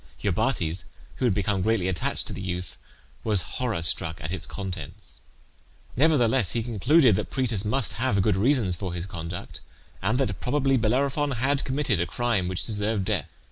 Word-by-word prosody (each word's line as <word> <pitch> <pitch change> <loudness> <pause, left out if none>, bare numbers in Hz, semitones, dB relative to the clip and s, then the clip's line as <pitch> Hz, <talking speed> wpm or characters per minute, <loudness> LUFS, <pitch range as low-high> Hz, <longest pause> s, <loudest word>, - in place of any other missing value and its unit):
Iobates, 85 +3 0 0.3
who 130 - 0
had 110 -6 +2
become 100 -1 0
greatly 110 -2 +1
attached 90 -3 -1
to - - -5
the - - -6
youth, 90 -2 -4 0.5
was 105 -4 +4
horror 115 -10 -2
struck 80 -1 +1
at 80 - -5
its 95 - -3
contents. 95 -1 -6 0.8
Nevertheless 130 - +3
he 115 - 0
concluded 120 - +4
that - - -3
Proetus 115 -7 0
must 115 +4 +2
have 105 -7 +2
good 105 -2 +2
reasons 110 -3 +2
for 90 0 -5
his 85 0 -3
conduct, 85 -1 -7 0.4
and 125 +4 +1
that 105 -10 -1
probably 135 +1 +1
Bellerophon 135 +5 +1
had 135 +4 +1
committed 130 - 0
a 90 - -1
crime 110 0 0
which 90 -1 -1
deserved 105 -2 0
death. - - -1
105 Hz, 170 wpm, -26 LUFS, 90-130 Hz, 0.8 s, was